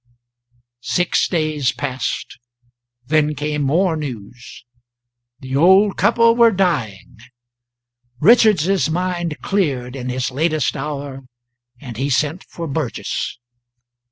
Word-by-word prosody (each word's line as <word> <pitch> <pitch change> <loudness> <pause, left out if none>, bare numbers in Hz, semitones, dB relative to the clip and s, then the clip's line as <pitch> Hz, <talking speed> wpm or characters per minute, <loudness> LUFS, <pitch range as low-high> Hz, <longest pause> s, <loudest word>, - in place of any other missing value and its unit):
Six 180 +7 0
days 155 -6 0
passed, 130 -2 -4 0.7
then 150 +1 +1
came 150 0 -2
more 165 +5 +1
news. 125 -5 -8 0.8
The 130 0 -5
old 190 +7 +5
couple 230 +3 +3
were 235 -1 +6
dying. 170 - -2 1.0
Richards's 195 - +4
mind 175 -2 -2
cleared 135 -10 -1
in 125 -1 -5
his 125 +1 -2
latest 155 +1 0
hour, 140 -2 -5 0.6
and 120 -6 -9
he 135 +3 -1
sent 150 +6 0
for 170 - -7
Burgess. 145 -4 -3
150 Hz, 100 wpm, -19 LUFS, 130-180 Hz, 1.0 s, were